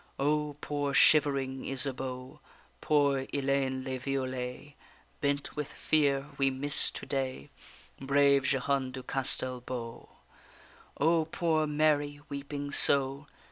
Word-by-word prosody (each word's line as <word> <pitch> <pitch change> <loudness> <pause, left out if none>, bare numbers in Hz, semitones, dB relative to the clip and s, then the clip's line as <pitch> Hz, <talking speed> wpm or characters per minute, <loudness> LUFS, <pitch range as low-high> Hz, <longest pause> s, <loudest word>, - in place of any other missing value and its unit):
O 150 +1 0
poor 145 -1 -2
shivering 135 -3 +4
Isabeau; 130 -1 -4 0.4
Poor 140 -3 +2
Ellayne 135 -1 0
le 130 -1 -4
Violet, 130 +1 -4 0.5
Bent 140 0 -1
with 150 -2 -4
fear! 140 -2 +1
we 135 0 +3
miss 140 +2 +1
to - - -8
day 130 - -3 0.5
Brave 140 0 +3
Jehane 135 0 0
du 130 0 -7
Castel 130 -1 0
beau. 120 -2 -7 0.9
O 160 +2 +3
poor 160 -1 0
Mary, 145 -1 +1
weeping 140 0 -5
so! 140 +1 +2
140 Hz, 110 wpm, -30 LUFS, 130-145 Hz, 0.9 s, shivering